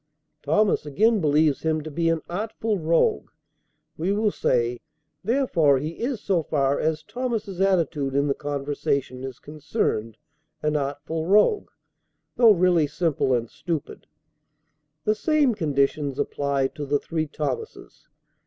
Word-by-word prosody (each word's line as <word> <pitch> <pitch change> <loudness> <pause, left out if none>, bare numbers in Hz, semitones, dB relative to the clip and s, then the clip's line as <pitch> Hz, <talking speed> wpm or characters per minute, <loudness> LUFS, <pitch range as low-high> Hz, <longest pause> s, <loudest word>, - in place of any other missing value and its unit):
Thomas, 190 +8 +2
again 215 +8 +2
believes 150 -1 +2
him 160 -1 0
to 155 - -7
be 165 +2 +1
an 165 -1 0
artful 215 +2 -2
rogue, 160 - +1 0.7
we 175 +5 0
will 210 +1 +1
say; 120 -6 0 0.4
therefore 185 - +3
he 155 +5 -5
is 245 -1 -2
so 190 -5 +1
far 140 -2 0
as 155 0 -1
Thomas's 220 -5 -3
attitude 160 -8 +1
in 140 +1 +3
the 140 - +1
conversation 140 -2 -2
is 130 -2 -6
concerned, 145 - -3 0.5
an 150 0 +1
artful 145 +3 -3
rogue, 210 - +3 0.7
though 235 -2 +6
really 175 -5 +3
simple 155 -3 0
and 120 -1 -2
stupid. 165 +4 -5 1.0
The 215 - +2
same 285 +3 +2
conditions 145 -5 0
apply 140 -1 0
to 145 -1 -7
the 145 +1 +2
three 155 +2 -3
Thomases. 155 - -6
155 Hz, 135 wpm, -24 LUFS, 140-200 Hz, 1.0 s, though